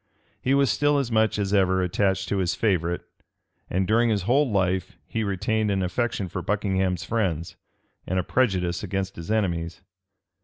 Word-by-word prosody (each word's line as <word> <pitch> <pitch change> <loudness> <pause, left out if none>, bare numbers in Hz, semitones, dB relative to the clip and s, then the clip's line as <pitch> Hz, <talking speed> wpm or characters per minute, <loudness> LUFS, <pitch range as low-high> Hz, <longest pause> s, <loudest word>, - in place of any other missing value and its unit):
He 130 +2 +2
was 140 -5 +3
still 145 +7 +2
as 135 -4 -1
much 110 -1 +2
as 100 -1 -1
ever 95 -2 +3
attached 95 +1 0
to 100 - 0
his 90 -2 0
favorite; 85 -5 0 0.7
and 95 +1 0
during 115 +4 +3
his 105 -4 0
whole 135 +7 +3
life 95 -3 0
he 110 - -2
retained 105 +2 0
an 95 -1 +1
affection 100 +1 -1
for - - -5
Buckingham's 95 -3 0
friends, 90 -8 -1 0.5
and 95 - -1
a 90 - +1
prejudice 90 -7 +1
against 95 -1 -3
his 85 +3 -8
enemies. 85 -5 -1
95 Hz, 165 wpm, -25 LUFS, 90-110 Hz, 0.7 s, was